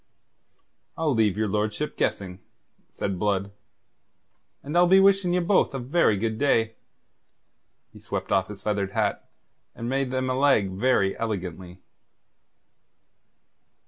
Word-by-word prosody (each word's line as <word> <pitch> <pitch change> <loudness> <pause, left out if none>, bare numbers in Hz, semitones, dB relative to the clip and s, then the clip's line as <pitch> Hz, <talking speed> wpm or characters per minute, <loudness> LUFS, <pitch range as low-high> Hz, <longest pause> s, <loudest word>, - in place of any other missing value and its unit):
"I'll 160 -3 +1
leave 110 -4 +1
your 110 0 0
lordship 105 +7 -2
guessing," 95 -2 -2 0.5
said 95 -3 -4
Blood. 100 -1 -1 1.1
"And 145 +4 -6
I'll 175 0 +5
be 190 +2 +6
wishing 195 -2 +4
ye 180 - +2
both 175 -4 +2
a - - -1
very 130 -4 +1
good 110 +1 -2
day." 115 -6 +2 1.2
He - - -13
swept - - -5
off 95 -1 +2
his 105 -1 -10
feathered 100 -2 -2
hat, 105 -2 -1 0.5
and 115 - -6
made 135 +1 -1
them 130 0 -2
a 130 - 0
leg 130 -8 +2
very 100 -1 +1
elegantly. 95 -4 -5
110 Hz, 130 wpm, -25 LUFS, 100-140 Hz, 1.2 s, be